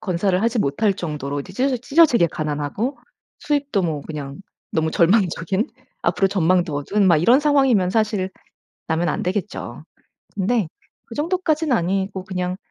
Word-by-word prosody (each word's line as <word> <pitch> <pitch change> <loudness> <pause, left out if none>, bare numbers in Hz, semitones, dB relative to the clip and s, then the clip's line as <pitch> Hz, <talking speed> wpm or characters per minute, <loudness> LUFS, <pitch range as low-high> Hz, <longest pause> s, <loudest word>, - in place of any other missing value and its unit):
건사를 185 0 0
하지 230 +1 +1
못 140 -2 -1
할 210 -2 +5
정도로 150 -5 -4
이제 185 - -10
찢어 260 +5 +1
찢어지게 255 - +4
가난하고 155 - -3 0.4
수입도 285 -8 0
뭐 160 -4 -1
그냥 140 -3 -7 0.3
너무 160 0 0
절망적인 185 +2 +2 0.3
앞으로 195 - +2
전망도 180 -4 +1
어두운 195 +8 +1
막 170 -4 +5
이런 235 - +5
상황이면 270 -11 +3
사실 210 -3 0 0.6
낳으면 165 +2 0
안 - - -2
되겠죠. 190 +3 -4 0.5
근데 205 -1 0 0.4
그 230 - -10
정도까진 320 -1 0
아니고 190 -1 -1
그냥 180 -1 -3
190 Hz, 335 characters per minute, -21 LUFS, 170-235 Hz, 0.6 s, 할